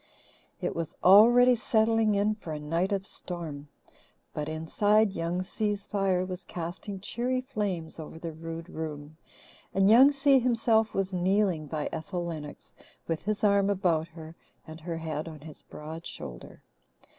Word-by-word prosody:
It - - -2
was 165 0 -4
already 240 +6 +7
settling 225 -2 +2
in 205 +2 +2
for 175 -7 -7
a 150 - -4
night 165 +6 -1
of 195 -1 -1
storm. 160 -8 -6 0.7
But, 150 0 -3
inside, 205 +7 +2
Young 175 0 -2
Si's 205 +1 -2
fire 195 -3 0
was 185 0 -6
casting 175 +4 -6
cheery 245 +6 -1
flames 200 - -4
over 160 0 -8
the 165 0 -6
rude 165 +1 -7
room, 155 -2 -7 0.6
and 195 +2 +5
Young 260 +5 +8
Si 275 -1 +4
himself 225 -2 +2
was 195 0 -1
kneeling 185 -3 +1
by 150 0 -3
Ethel 175 +2 -4
Lennox 155 -3 -8 0.3
with 165 +1 -3
his 210 0 -2
arm 200 -1 +4
about 175 -5 +1
her 160 -1 -11 0.3
and 160 0 -10
her 165 +1 -5
head 160 -1 -4
on 155 -3 -9
his 155 -1 -12
broad 160 +2 -9
shoulder. - - -9
180 Hz, 155 wpm, -28 LUFS, 160-210 Hz, 0.7 s, Young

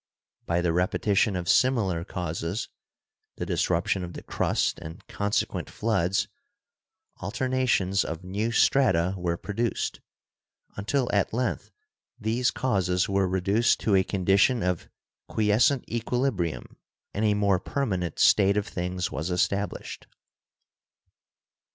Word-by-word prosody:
By 85 +1 +1
the 85 -1 +1
repetition 95 +3 +1
of 90 -1 -3
similar 110 -10 +2
causes 85 +2 -4 0.7
(the - - -4
dis - - 0
ruption 90 +2 0
of 90 0 -7
the - - -8
crust - - 0
and 85 +7 -10
consequent 100 0 -2
floods), 90 +3 0 0.9
alternations 110 -3 0
44 80 - -2
GEOLOGY 85 +3 -15
of - - -8
new 110 +4 -1
strata 105 -8 +3
were 85 -2 -2
produced, 110 +5 -2 0.7
until 120 +6 0
at 100 0 +1
length 125 +2 -2 0.5
these 120 +2 +1
causes 90 -7 0
were 100 -1 +1
reduced 100 +5 +2
to 105 - +1
a 95 - +4
condition 95 +5 +2
of" 90 -2 -2 0.4
quiescent 110 +5 +2
equilibrium 120 - -2 0.4
and 105 - -2
a 105 -1 +3
more 100 -3 +2
permanent 95 - -2
state 100 0 +5
of 105 - 0
things 90 0 -3
was 80 +4 -3
established. 100 +3 -2
100 Hz, 125 wpm, -26 LUFS, 90-110 Hz, 0.9 s, state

